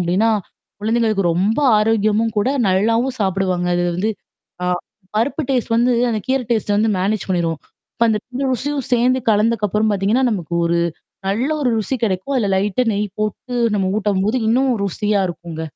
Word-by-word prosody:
அப்டின்னா, 185 +6 +2 0.5
குழந்தைங்களுக்கு 220 -2 +1
ரொம்ப 195 - +1 0.2
ஆரோக்கியமும் 215 +1 +1
கூட 205 +5 +1 0.2
நல்லாவும் 230 +7 +1
சாப்பிடுவாங்க. 190 -2 0
அதுல 175 0 0
வந்து 205 +5 0 0.5
ஆ - - -1 0.5
பருப்பு 275 +8 0
டேஸ்ட் 245 -3 0
வந்து 245 +2 +3 0.2
அந்த 220 -2 -1
கீரை 265 -1 +1
டேஸ்ட்ட 215 -3 +1
வந்து 220 +1 +2
மேனேஜ் 200 +1 -1
பண்ணிரும். 170 -3 0 0.4
இப்ப 235 - +1
அந்த 215 -1 +2
2 255 +2 -4
ருசியும் 275 +2 -2
சேர்ந்து 250 +2 +3
கலந்ததுக்கு 215 0 +2
அப்புறம் 215 +2 +1
பார்த்தீங்கன்னா, 205 +6 +1
நமக்கு 175 -6 -3
ஒரு 170 0 +1 0.5
நல்ல 230 +8 0
ஒரு 270 - +1
ருசி 220 +5 -2
கிடைக்கும். 195 +6 -2
அதில 220 -5 +1
லைட்டா 205 +5 +1
நெய் 205 +1 -1
போட்டு 215 +4 -3 0.2
நம்ம 195 -2 +1
ஊட்டம்போது 205 +2 0
இன்னும் 260 +4 +3 0.2
ருசியா 205 +2 0
இருக்குங்க. 170 -2 -7
215 Hz, 160 wpm, -19 LUFS, 190-235 Hz, 0.5 s, வந்து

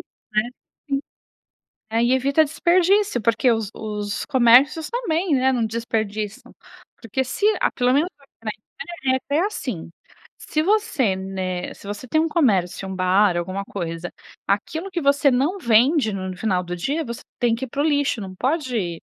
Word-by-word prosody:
é, 215 +3 -2 0.4
sim, 275 -1 +1 0.9
é 230 +1 +2
e 240 +2 +3
evita 275 +4 +3
desperdício, 355 - +2
porque 230 +4 +3
os 225 -3 -1
os 210 -2 -4
comércios 265 +5 +5
também, 360 - 0
né. 260 +1 +3
Não 240 -3 +1
desperdiçam, 215 -2 -3 0.5
porque 240 +4 -1
se 260 +10 -2 0.2
a - - +2
pelo 250 -1 +1
menos 310 +6 +2
aqui 275 -5 -26
na 215 - 0 0.7
Itália - - -4 0.2
é - - +2
assim 245 - -5 0.5
se 310 - -2
você 380 - +2
né, 190 -1 -4
se - - -14
você 205 +4 -6
tem 315 - +2
um 325 - +1
comércio, 200 - +1
um 190 - -4
bar, 185 0 +3
alguma 185 +3 -3
coisa, 170 -3 -5 0.4
aquilo 315 - -1
que 350 -2 -2
você 280 -1 +4
não 275 +9 +1
vende 240 - +3
no 185 -1 -4
final 185 -3 0
do 175 0 -4
dia, 285 - -1
você 235 -1 -7 0.2
tem 240 -2 +3
que 240 +3 -4
ir - - -8
para 280 +4 -4
o - - 0
lixo, 285 -5 +1
não 190 -2 -7
pode 245 - -1
240 Hz, 170 wpm, -22 LUFS, 200-290 Hz, 0.9 s, comércios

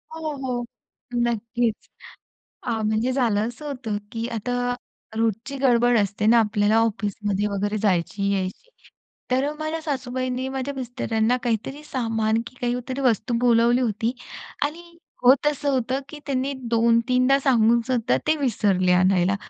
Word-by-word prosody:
हो, 315 -1 -3
हो. 250 -2 -3 0.5
नक्कीच. 235 -1 -1 0.8
अ, 240 - -3
म्हणजे 220 +4 +1
झालं 230 -4 +1
असं 295 +5 -9
होतं, 245 -7 -3 0.2
की 230 0 -3
आता 230 +3 -3 0.6
रोजची 225 +5 -1
गडबड 245 -2 +4
असते 205 +1 0
ना 235 +1 +6
आपल्याला 210 0 +2
ऑफिसमध्ये 205 -2 0
वगैरे 205 +1 -1
जायची, 200 0 0
यायची. 190 - -3 0.6
तर 270 +4 +1
माझ्या 315 +1 -3
सासूबाईंनी 255 -2 -2
माझ्या 270 +1 -3
मिस्टरांना 245 -2 0
काहीतरी 245 +5 -2
सामान 225 -4 0
की - - -10
काहीतरी 250 +2 -2
वस्तू 245 -1 +1
बोलावली 240 +1 +4
होती 225 0 0 0.5
आणि 335 +3 -5 0.3
होत 265 +4 +5
असं 290 -1 +1
होतं, 260 +2 0
की 300 +1 -9
त्यांनी 270 0 -1 0.2
दोन-तीनदा 235 +3 +3
सांगूनसुद्धा 235 -1 +3
ते 310 - +3
विसरले 200 -9 +2
आणायला. 185 +1 +3
240 Hz, 130 wpm, -24 LUFS, 220-260 Hz, 0.8 s, ना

